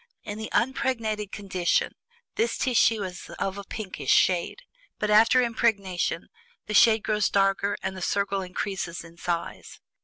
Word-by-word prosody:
In 205 +1 -6
the 220 - -5
unimpregnated 230 -5 -1
condition 185 -4 0 0.4
this 450 +2 0
tissue 230 -4 +2
is 180 -2 -7
of 195 +1 -3
a - - -6
pinkish 205 -1 -6
shade; 185 - +2 0.3
but 210 - -1
after 230 +4 +6
impregnation 200 -8 0 0.4
the 210 - -5
shade 220 0 +5
grows 210 -2 +1
darker 195 +1 +1
and 190 - -3
the 185 - -8
circle 200 +1 0
increases 180 -2 -4
in 170 0 -15
size. 170 -1 -4
200 Hz, 145 wpm, -26 LUFS, 185-220 Hz, 0.4 s, after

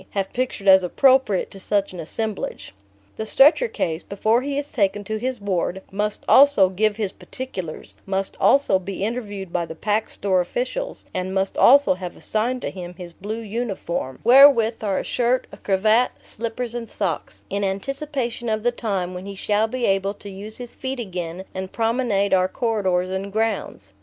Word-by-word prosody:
have 195 -1 -3
pictured 245 -5 -2
as 190 0 +8
appropriate 255 +1 +3
to 195 - -11
such 200 0 0
an 180 - -8
assemblage. 210 - -3 0.4
The 220 - -4
stretcher 300 - +5
case, 165 - -2
before 220 +4 +1
he 280 +1 -3
is 290 0 -3
taken 205 -2 0
to 220 +2 -3
his 255 +1 -3
ward, 190 -1 -2
must 210 +2 -2
also 270 -9 +6
"give 205 +3 +1
his 205 -3 -2
particulars," 185 -13 -7
must 195 0 -2
also 275 -9 +4
be 190 +1 -5
interviewed 205 -5 -4
by 170 -2 -1
the 160 - -8
Pack 210 +5 -1
Store 190 -2 +1
officials, 255 - -4
and 185 +1 -3
must 190 0 0
also 280 -3 +6
have 180 -1 -7
assigned 240 +4 -1
to - - -2
him 180 -1 -8
his 175 -1 -9
blue 215 +6 -5
uniform 205 - -4
(wherewith 240 -3 +6
are 195 -3 0
a - - -1
shirt, 245 +1 +1
a - - -11
cravat, 215 +5 +2
slippers 230 +1 -5
and 235 -2 -5
socks) 185 -6 -3
in 200 +1 -1
anticipation 240 +4 -3
of 215 0 -1
the 245 - +3
time 195 -7 -2
when 180 +2 -7
he 200 - -6
shall 210 +3 +1
be 245 +1 -2
able 195 +1 +1
to 205 0 -10
use 205 +3 -8
his 245 -1 -8
feet 265 0 -5
again 180 -4 -5
and 190 0 -5
promenade 225 -4 +1
our 185 -1 +4
corridors 190 -5 0
and 195 +1 -3
grounds. 210 - -2
205 Hz, 180 wpm, -22 LUFS, 190-240 Hz, 0.4 s, as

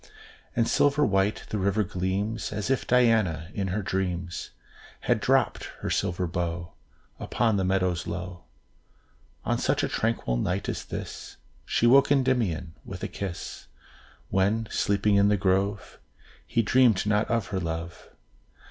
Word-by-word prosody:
And 115 -1 +2
silver 145 +1 +3
white 95 +1 +1
the 105 - -2
river 100 +2 +1
gleams, 100 +5 -2
As 105 +4 -2
if 135 - 0
Diana, 110 -10 +3
in 100 -2 -2
her 100 +3 -2
dreams, 90 -2 -3 0.5
Had - - +1
dropt - - +2 0.2
her - - -2
silver 90 +1 0
bow 85 0 -3 0.5
Upon 115 -3 +1
the 95 - +1
meadows 90 -2 0
low. 90 -1 -6 1.0
On - - 0
such - - +1
a - - +2
tranquil 110 - -1
night 90 +10 -1
as - - -3
this, - - -7 0.3
She - - +1
woke 135 +4 +6
Endymion 120 - +1
with - - -8
a - - 0
kiss, 95 -4 -6 0.6
When, 105 +4 +1
sleeping 100 0 +2
in 100 0 +5
the 105 0 +3
grove, 100 +1 0 0.5
He 115 - +1
dreamed 120 -3 +4
not 105 +1 +1
of 115 -3 0
her 95 - -1
love. 85 0 -5
100 Hz, 145 wpm, -27 LUFS, 90-110 Hz, 1.0 s, woke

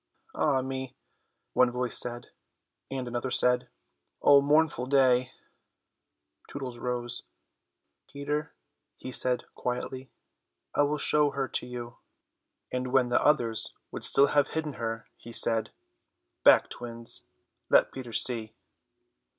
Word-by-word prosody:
"Ah 135 -4 +1
me!" 130 0 -5 0.6
one 125 - +4
voice 125 0 -2
said, 120 0 -4 0.6
and 130 -2 -4
another 120 +2 -3
said, 125 0 +2 0.5
"Oh, 140 -1 +6
mournful 145 -3 +2
day." 130 -2 +3 1.2
Tootles 130 -4 -6
rose. 120 -1 -3 0.9
"Peter," 150 +1 -3 0.5
he 130 - -7
said 125 0 +1
quietly, 130 +1 -4 0.6
"I - - +2
will 145 +1 +1
show 150 0 +3
her 135 -1 -2
to - - -1
you," 120 -1 -7 0.7
and 125 0 -3
when 130 -2 +3
the 120 - +2
others 120 -7 +2 0.2
would - - -6
still 140 - +6
have 145 -1 +4
hidden 155 -2 -3
her 115 -1 -3
he 120 - -11
said, 115 -2 +2 0.7
"Back, - - +6
twins, 115 -1 -6 0.5
let - - +5
Peter 130 -3 -8
see." 110 -1 -1
125 Hz, 120 wpm, -28 LUFS, 120-140 Hz, 1.2 s, Oh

